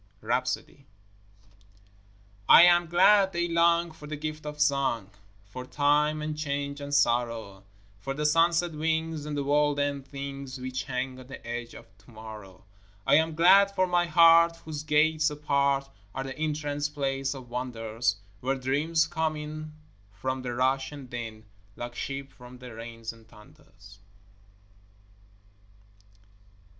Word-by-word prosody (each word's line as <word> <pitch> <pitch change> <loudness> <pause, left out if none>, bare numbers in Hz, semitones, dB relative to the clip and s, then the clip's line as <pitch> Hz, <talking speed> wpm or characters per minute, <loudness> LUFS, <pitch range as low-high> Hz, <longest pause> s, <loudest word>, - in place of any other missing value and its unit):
RHAPSODY 135 - -2 1.6
I - - +10
am 175 -1 +5
glad 190 +3 +5
daylong 170 -1 +2
for 150 -1 -12
the 150 - -4
gift 155 0 -6
of 150 0 -7
song, 135 -8 +1 0.3
For 100 +6 -8
time 150 +3 +1
and 155 0 -3
change 145 -1 -3
and 140 0 -6
sorrow; 115 -7 0 0.3
For 135 +7 -4
the 150 +1 -2
sunset 165 +2 +3
wings 160 0 -2
and 150 -1 -3
the 140 - -1
world 145 +1 +2
end 140 -1 -2
things 140 -1 -7
Which 130 0 -4
hang 130 0 -4
on 130 - -12
the 135 - -11
edge 120 0 -5
of 95 - -14
to 100 - -21
morrow. 110 -3 -11 0.4
I - - +3
am 160 0 +1
glad 195 +4 +6
for 185 - +3
my 175 -1 +1
heart 165 0 +6
whose 155 -2 -5
gates 155 +1 +2
apart 140 -2 0 0.3
Are 135 - -2
the 135 0 -6
entrance 150 -1 -2
place 135 -1 -2
of 125 -3 -11
wonders, 115 -2 -2 0.2
Where 135 +4 -1
dreams 145 +5 +1
come 160 -2 -1
in 155 0 -7 0.4
from 130 +5 -4
the 125 -1 -4
rush 130 +2 +1
and 140 -4 -10
din 115 -2 -6 0.3
Like 120 0 -6
sheep 135 +2 -5
from 125 0 -13
the 125 -1 -10
rains 115 0 -7
and 115 -1 -19
thunders. 105 -4 -18
140 Hz, 145 wpm, -27 LUFS, 125-155 Hz, 1.6 s, I